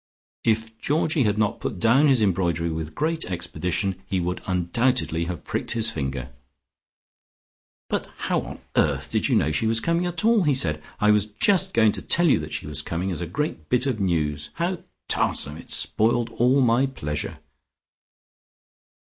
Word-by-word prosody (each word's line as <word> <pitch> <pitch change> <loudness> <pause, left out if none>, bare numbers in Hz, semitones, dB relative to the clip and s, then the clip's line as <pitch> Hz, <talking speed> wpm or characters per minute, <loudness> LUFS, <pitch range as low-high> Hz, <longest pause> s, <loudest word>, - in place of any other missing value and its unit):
If 110 0 0
Georgie 150 -2 +1
had 105 0 +1
not 105 -1 0
put 100 - -4
down 125 +9 +4
his 130 -6 +4
embroidery 85 -4 0
with 80 -1 -5
great 160 +1 -1
expedition, 90 +2 -2
he 95 -2 -1
would 90 +1 -2
undoubtedly 85 -2 0
have 85 -1 -5
pricked - - -2
his 115 -1 0
finger. 65 -3 -4 1.6
"But - - -2 0.2
how - - +1
on - - -9
earth - - +1
did - - +1
you - - +3
know 75 - +2
she 75 +9 +1
was 115 0 +3
coming 170 +7 0
at 175 +3 -2
all?" 230 -2 +5
he 150 -6 +2
said. 75 - +2 0.2
"I 105 0 +4
was 105 0 +2
just 190 - +2
going 110 -2 +5
to - - -6
tell 175 0 +3
you 135 - +4
that 75 0 -7
she - - -4
was 75 -1 -2
coming, 85 +5 -3
as 90 - -4
a 85 - -3
great 90 - -4
bit 125 +1 +2
of 130 -5 -1
news. 75 -5 -1
How 175 +1 -1 0.3
tarsome! 75 +2 +1
It's - - -4
spoiled 115 +1 +1
all 125 +4 +3
my 125 +2 +3
pleasure." 75 - -4
105 Hz, 175 wpm, -24 LUFS, 85-130 Hz, 1.6 s, all